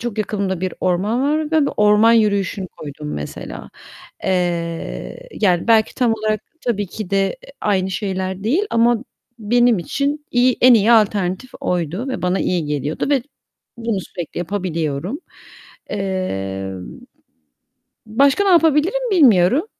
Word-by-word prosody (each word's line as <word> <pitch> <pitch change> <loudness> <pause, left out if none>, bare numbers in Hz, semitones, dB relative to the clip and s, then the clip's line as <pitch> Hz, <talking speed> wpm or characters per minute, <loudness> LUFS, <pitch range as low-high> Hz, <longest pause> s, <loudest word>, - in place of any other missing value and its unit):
çok 230 -2 -4
yakınımda 200 -4 -2
bir 185 -1 -3
orman 195 +7 0
var 300 +2 0
ve 310 -3 +3
bu - - -1
orman 210 +2 +5
yürüyüşünü 200 -4 +1
koydum 150 0 -8
mesela. 75 - -7 0.5
Eee, 170 - -2
yani, 185 0 +2
belki 220 -1 +4
tam 245 -3 +2
olarak 215 -1 -1 0.2
tabii 205 -4 -1
ki 200 +1 -7
de, 195 0 +2 0.2
eee, - - -14
aynı 190 -2 0
şeyler 190 -1 -3
değil 305 - +2
ama 235 +1 +2 0.3
benim 240 0 +3
için 285 - -2
iyi 250 +1 +3
en 250 -1 +8
iyi 225 +2 +4
alternatif 205 +1 +1
oydu 180 - -2
ve 260 - -4
bana 180 +1 +1
iyi 175 -3 0
geliyordu 145 0 -2
ve 275 -4 +2 0.6
bunu 230 -4 -2
sürekli 175 -2 -7
yapabiliyorum. 175 - -3 0.7
Eee, 95 - -3 1.3
başka 275 - +3
ne 395 - +3
yapabilirim 345 - +3
bilmiyorum, 260 - +4
205 Hz, 135 wpm, -19 LUFS, 180-245 Hz, 1.3 s, en